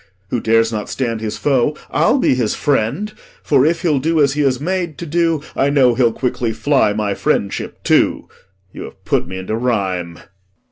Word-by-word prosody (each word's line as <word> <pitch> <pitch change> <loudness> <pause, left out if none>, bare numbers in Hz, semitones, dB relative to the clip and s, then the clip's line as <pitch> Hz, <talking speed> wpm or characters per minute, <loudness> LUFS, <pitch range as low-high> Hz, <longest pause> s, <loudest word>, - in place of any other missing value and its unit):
Who 120 - 0
dares 115 0 +2
not 105 -1 -4
stand 115 -4 -2
his 110 -1 -4
foe 145 +1 +1
I'll 275 - +3
be 255 - +2
his 120 -4 0
friend; 145 - -1 0.3
For 140 -1 +3
if 165 +2 -1
he'll 155 -6 +2
do 160 +3 0
as 140 -2 +3
he 150 - -1
is 130 -3 +1
made 175 0 -2
to 170 - -6
do, 165 -1 0
I 140 - +2
know 135 -4 +4
he'll 120 -1 +2
quickly 120 -1 -2
fly 130 -3 +2
my 105 -1 -1
friendship 100 0 -2
too. - - +2 0.5
You - - -7
have - - -14
put - - 0
me 95 +1 -6
into 95 +4 -3
rhyme. 95 -8 -2
130 Hz, 190 wpm, -18 LUFS, 110-150 Hz, 0.5 s, know